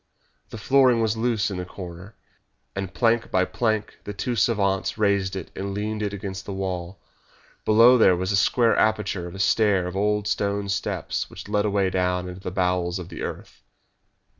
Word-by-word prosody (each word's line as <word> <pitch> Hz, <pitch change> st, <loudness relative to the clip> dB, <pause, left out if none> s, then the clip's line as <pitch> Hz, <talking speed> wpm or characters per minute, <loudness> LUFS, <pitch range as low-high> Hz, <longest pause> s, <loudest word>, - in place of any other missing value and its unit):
The -, -, -8 dB
flooring 130 Hz, 0 st, +4 dB
was 110 Hz, -1 st, +1 dB
loose 110 Hz, -3 st, 0 dB
in 95 Hz, -, -4 dB
the 90 Hz, -, -4 dB
corner, 90 Hz, +2 st, -10 dB, 0.6 s
and 95 Hz, -1 st, -4 dB
plank 115 Hz, +5 st, +1 dB
by 95 Hz, 0 st, +2 dB
plank 110 Hz, 0 st, -2 dB
the 105 Hz, -, -6 dB
two 120 Hz, +4 st, -2 dB
savants 100 Hz, -3 st, +1 dB
raised 100 Hz, -3 st, +1 dB
it 95 Hz, -, -6 dB
and 100 Hz, 0 st, -4 dB
leaned 105 Hz, +1 st, -3 dB
it 105 Hz, -1 st, -1 dB
against 95 Hz, -1 st, -6 dB
the 100 Hz, -, -4 dB
wall. 95 Hz, -1 st, -4 dB, 0.7 s
Below 115 Hz, +3 st, +6 dB
there 95 Hz, -, +6 dB
was 95 Hz, +2 st, -2 dB
a -, -, +2 dB
square 115 Hz, +4 st, +3 dB
aperture 105 Hz, -4 st, 0 dB
and 90 Hz, -, -9 dB
a -, -, -8 dB
stair 100 Hz, -2 st, +3 dB
of 90 Hz, +1 st, -5 dB
old 105 Hz, +1 st, 0 dB
stone 100 Hz, -1 st, -1 dB
steps 95 Hz, -, -2 dB
which -, -, -10 dB
led 105 Hz, 0 st, +1 dB
away 100 Hz, -2 st, +1 dB
down 90 Hz, -1 st, 0 dB
into 90 Hz, 0 st, -8 dB
the 95 Hz, -, -4 dB
bowels 90 Hz, -1 st, 0 dB
of 90 Hz, -2 st, -7 dB
the 85 Hz, -, -8 dB
earth. -, -, -7 dB
100 Hz, 190 wpm, -24 LUFS, 95-110 Hz, 0.7 s, Below